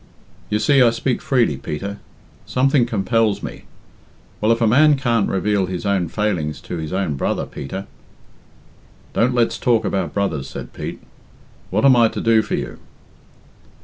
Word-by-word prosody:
"You 105 - +1
see 140 +5 +3
I 120 - +7
speak 115 +2 -1
freely, 120 - +1
Peter 100 +9 -5 0.5
something 130 -1 +2
compels 110 -1 0
me. - - -7 0.8
Well, 110 +2 +3
if 115 - +2
a 115 - +2
man 145 +6 +5
can't 120 -6 +1
reveal 100 0 0
his 90 0 -5
little 100 -3 +1
failings 90 -8 -1
to 90 - -6
his 80 -1 -5
own 95 -4 -1
brother, - - -1
Peter 95 +9 -7 0.7
" - - -29
"Don't 125 +2 +2
let's 120 -1 +1
talk 120 -3 +2
about 95 - -2
brothers," 80 -10 -1
said - - -8
Pete. - - -6 0.7
"What 105 +7 +1
am 135 -2 +7
I 120 -1 +5
to - - -5
do 115 -1 +4
for - - -3
you?" - - -5
105 Hz, 165 wpm, -20 LUFS, 95-120 Hz, 0.8 s, I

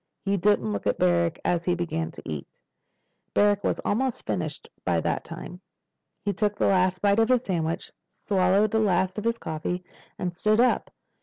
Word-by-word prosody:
He 200 0 +2
didn't 180 - +2
look 100 - -3
at 100 - +1
Barrack 170 -2 +2
as 175 -1 +1
he 180 0 +1
began 165 -2 -2
to 165 - -12
eat. 75 -3 -5 0.9
Barrack 205 0 +4
was - - +1
almost 255 +3 0
finished - - -3 0.2
by - - +1
that - - -1
time. - - -9 0.6
He 205 - +1
took 210 -1 0
the - - +2
last 185 -1 +2
bite 200 +1 +4
of 225 +1 +3
his 250 -1 +3
sandwich, 165 -5 -2 0.2
swallowed 195 +1 +2
the 220 - +2
last 190 -1 +1
of 210 - -7
his 230 0 +1
coffee, 170 +1 -3 0.3
and 180 -1 -3
stood 215 +4 +2
up. 250 +1 +3
185 Hz, 180 wpm, -26 LUFS, 170-210 Hz, 0.9 s, Barrack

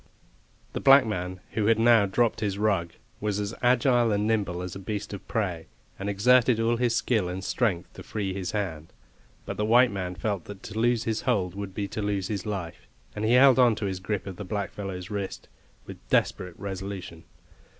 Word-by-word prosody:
The - - -2
black 135 -1 +7
man, 90 -3 -4
who 105 0 0
had 115 -1 +4
now 115 -2 +5
dropped 115 +4 +1
his 100 -2 -1
rug, 100 -6 0 0.3
was 105 -1 -1
as 105 +1 -3
agile 120 -1 +3
and 105 0 +1
nimble 100 -5 0
as 90 0 -6
a - - -6
beast 105 +2 -5
of 100 - -8
prey, 90 -8 -2 0.3
and 100 +1 -3
exerted 120 +3 +4
all 115 +1 +2
his 120 -1 +1
skill 110 -6 +1
and 90 +1 -5
strength 95 -6 -1
to - - -10
free 100 -3 -3
his 95 -1 -4
hand. 85 -7 -4 0.5
But - - -5
the 105 - 0
white 120 +2 +5
man 90 -2 -4
felt 100 -3 -3
that 100 -1 -10
to 110 +1 -5
loose 120 0 +2
his 110 -1 -1
hold 100 -9 0
would 100 -1 -6
be 100 -2 -2
to 110 - -4
lose 100 -2 -1
his 100 -2 -3
life, 85 -10 -5 0.3
and 105 - -4
he 110 +2 +3
held 130 +1 +7
on 120 -3 +5
to 110 -1 -4
his 95 -2 -3
grip 100 +1 -3
of 95 -3 -7
the - - -5
blackfellow's 95 -1 -5
wrist 100 -2 -4 0.4
with - - -10
desperate 90 -2 0
resolution. 95 -3 -6
100 Hz, 200 wpm, -27 LUFS, 95-115 Hz, 0.5 s, black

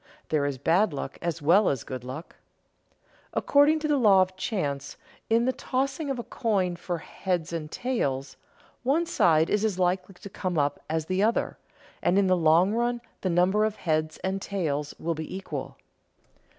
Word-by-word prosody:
There 145 -2 +1
is 140 -2 -3
bad 170 - +2
luck 140 -1 -5
as 170 -3 -3
well 185 +7 +5
as 135 -4 -2
good 130 -2 -6
luck. 130 +7 -8 1.0
According 290 +2 +4
to 305 - 0
the 295 -1 +2
law 200 -5 +6
of 185 0 -7
chance, 145 - -3 0.3
in 230 +1 +3
the 260 - +1
tossing 275 +4 -2
of 270 - -1
a 240 - -4
coin 195 -9 0
for 175 0 -4
"heads 175 -1 -3
and 155 -2 -4
tails," 140 - -2 0.5
one 285 +7 +2
side 160 - +3
is 210 0 +1
as 210 -4 0
likely 185 +1 0
to 190 - -10
come 180 -2 -3
up 145 -1 +1
as 160 0 -1
the 185 +3 0
other, 225 +3 +1 0.4
and 180 - +2
in 200 - +4
the 185 -1 +4
long 170 +4 +4
run 240 +1 0 0.2
the 185 - 0
number 180 +5 +3
of 215 -1 0
heads 155 -2 -1
and 190 +1 -1
tails 150 -8 -2
will 165 +1 -2
be 160 +3 -6
equal. 195 - -6
185 Hz, 180 wpm, -27 LUFS, 155-215 Hz, 1.0 s, law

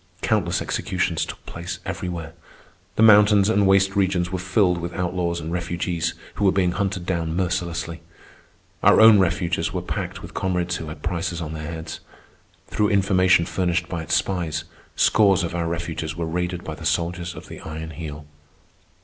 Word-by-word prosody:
Countless - - +1
executions - - -1
took - - -9
place 85 +1 -6
everywhere. 90 -3 -5 0.6
The 110 - +3
mountains 105 -1 +6
and 105 -3 +3
waste 95 0 +4
regions 95 -2 +1
were 95 - -2
filled 90 -1 +2
with 85 0 -5
outlaws 90 -1 -1
and 80 0 -5
refugees 85 -1 -2 0.2
who 100 - -1
were 95 - +6
being 90 -2 +2
hunted 95 -1 -2
down 85 -3 -1
mercilessly. 85 -2 -2 0.8
Our - - +6
own 110 -2 +8
refuges 85 -2 0
were - - -2
packed - - -4
with - - -9
comrades 90 -1 -1
who 80 - -7
had 75 -1 -9
prices 85 0 -2
on 80 -2 -5
their 80 0 -5
heads. 80 -1 -6 0.7
Through 105 -1 0
information 95 -3 +4
furnished 85 -1 -1
by 85 -2 -3
its 80 - 0
spies, 85 -5 -1 0.3
scores 100 -4 +4
of 85 - -3
our 85 -1 -1
refuges 80 -2 -3
were 85 - -2
raided 90 +2 -2
by - - -5
the - - -10
soldiers 85 +1 -1
of - - -10
the - - -9
Iron 80 +1 -7
Heel. 75 -2 -7
90 Hz, 170 wpm, -23 LUFS, 85-95 Hz, 0.8 s, own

